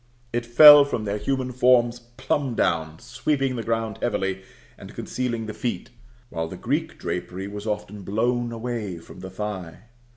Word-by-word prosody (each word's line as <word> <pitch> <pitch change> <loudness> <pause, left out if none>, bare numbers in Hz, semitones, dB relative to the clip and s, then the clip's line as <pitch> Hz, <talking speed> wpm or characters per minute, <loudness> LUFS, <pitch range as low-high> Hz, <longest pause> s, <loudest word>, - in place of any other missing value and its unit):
It 120 0 -2
fell 145 +4 +10
from 120 -6 -3
their 105 +1 -2
human 130 +3 -2
forms 120 -1 +3
plumb 120 +2 -3
down, 80 -4 0
sweeping 135 - -1
the 115 - -3
ground 115 -1 -2
heavily, 95 -5 -1 0.3
and - - -12
concealing 120 -3 -3
the 110 - -6
feet; 125 +1 -4 0.4
while 80 -1 -3
the - - -8
Greek - - -2
drapery 95 +2 -4
was 105 +1 -7
often 105 -1 -4
blown 120 +5 -1
away 115 -5 -4
from 85 - -13
the 95 0 -8
thigh. 95 -3 -6
115 Hz, 160 wpm, -24 LUFS, 100-125 Hz, 0.4 s, fell